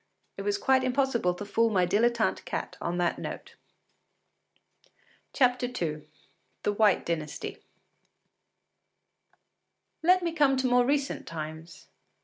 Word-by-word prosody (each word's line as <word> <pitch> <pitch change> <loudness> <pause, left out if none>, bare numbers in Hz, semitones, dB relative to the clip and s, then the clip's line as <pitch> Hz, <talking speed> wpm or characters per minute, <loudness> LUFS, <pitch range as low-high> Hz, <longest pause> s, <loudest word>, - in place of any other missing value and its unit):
It - - -6
was 410 -1 0
quite 265 -8 +3
impossible 255 -8 +1
to 205 - -7
fool 230 +3 +2
my 185 -4 +2
dilettante 230 +5 +1
cat - - -4
on 170 +1 -2
that 175 -1 0
note. - - -7 1.9
II 245 - +1 0.6
THE 205 - +1
WHITE 210 0 +3
DYNASTY 155 -3 -4 2.4
Let 365 +2 +4
me 340 - 0
come 285 -4 +3
to 260 - 0
more 245 -1 +4
recent 280 0 -1
times. 160 +1 -8
235 Hz, 115 wpm, -28 LUFS, 175-265 Hz, 2.4 s, Let